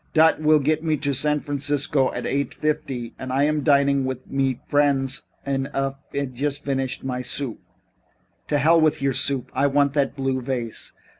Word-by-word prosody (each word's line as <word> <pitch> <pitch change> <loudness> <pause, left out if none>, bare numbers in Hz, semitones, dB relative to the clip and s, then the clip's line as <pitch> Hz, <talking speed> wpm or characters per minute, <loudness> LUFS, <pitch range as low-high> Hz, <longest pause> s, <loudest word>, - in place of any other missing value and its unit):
Dot 160 0 +5
vill 155 0 +5
get 155 +2 0
me 155 -2 +1
to 140 0 -1
San 150 +2 +1
Francisco 145 -1 0
at - - -5
eight 140 +1 -1
fifty 130 -6 -2
und 130 0 -5
I 135 +2 +2
am 150 0 +1
dining 140 -2 +3 0.2
mit 135 -2 -1
friends 140 -1 +1 0.2
und 135 -1 -1
haf 135 0 -1 0.4
just 140 +3 -3
finished 135 -2 -2
my 125 -1 -2
soup." 125 -1 -3 0.9
"To 145 - +1
hell 160 +3 +5
with 155 -2 +2
your 135 -1 +2
soup. 135 -1 0
I 140 +2 +2
want 140 0 +2
that 140 -1 0
blue 135 -1 -1
vase." 120 -3 -3
140 Hz, 170 wpm, -23 LUFS, 135-145 Hz, 0.9 s, Dot